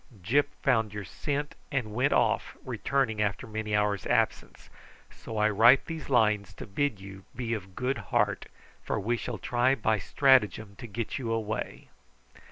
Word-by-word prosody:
Gyp 140 +10 +3 0.2
found 110 -5 +2
your 105 -1 -5
scent 145 +8 -3 0.2
and 125 -6 -2
went 125 +6 +2
off, - - +1
returning 130 -6 0
after 100 +4 -1
many 110 -2 -3
hours' 105 -1 0
absence; - - 0 0.4
so 110 - -8
I 105 0 +4
write 120 +6 +6
these 160 -3 -6
lines 105 -6 +2
to - - -8
bid 110 +2 -1
you 95 0 -10
be 120 -2 -2
of 95 -4 -6
good 130 +2 -1
heart, - - +1 0.3
for - - -2
we 120 +5 0
shall 120 -1 -5
try 125 +5 +2
by 110 -5 +1
stratagem 110 -7 +3
to 120 - -8
get 115 +5 -4
you 130 - -5
away_." 110 -1 -3
110 Hz, 165 wpm, -28 LUFS, 105-130 Hz, 0.4 s, write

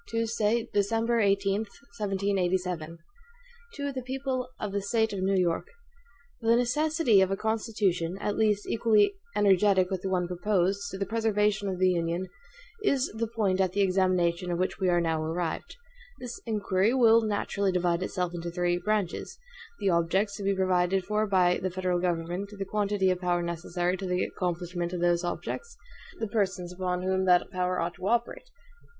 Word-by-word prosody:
Tuesday, 230 0 0
December 225 +3 +1
18, 195 -1 +2
1787. 195 - -2
HAMILTON 165 +2 -11 0.7
To 285 -1 -3
the 260 -1 -4
People 260 0 -3
of 205 - -3
the 200 0 -1
State 220 +2 0
of 195 - -3
New 195 +1 +2
York: 175 - 0 0.7
THE 230 0 +4
necessity 250 - +3
of 190 - +3
a 195 - -1
Constitution, 210 -6 -1
at 210 - -2
least 210 -2 +1
equally 220 - +3 0.2
energetic 195 -1 +4
with 190 -2 -2
the 190 - -3
one 180 -2 0
proposed, 195 +2 0
to 190 - -6
the 195 - -1
preservation 210 -1 +1
of 185 - -3
the 185 0 +3
Union, 170 +1 -1 0.6
is 275 -9 +1
the 230 +1 -1
point 205 -4 0
at 185 -1 +1
the 200 - +1
examination 185 -2 +1
of 170 - -1
which 185 +1 -1
we 185 - +2
are 175 -1 +3
now 160 -1 0
arrived. 165 +1 -3 0.4
This 245 -1 -7
inquiry 210 +1 +1
will 230 -3 +6
naturally 200 -2 -1
divide 175 -1 +1
itself 180 -1 -2
into 170 0 -4
three 175 0 0
branches 210 -3 -2 0.4
the 195 - +1
objects 190 +5 +1
to 205 - -6
be 195 0 +1
provided 185 0 +1
for 210 +2 0
by 180 -3 +3
the 185 - -1
federal 180 -1 -1
government, 175 +2 -2
the 195 - -3
quantity 200 -1 +1
of 180 0 -2
power 175 -1 +1
necessary 175 +1 -2
to 190 0 -5
the 180 0 0
accomplishment 175 -1 -3
of 175 - -3
those 175 0 +2
objects, 325 - -5 0.4
the 225 - -2
persons 190 -4 -1
upon 180 0 -2
whom 190 0 +1
that 180 +1 +3
power 180 -1 -1
ought 170 +1 -1
to 190 - -6
operate. 240 - -1
190 Hz, 175 wpm, -28 LUFS, 180-215 Hz, 0.7 s, will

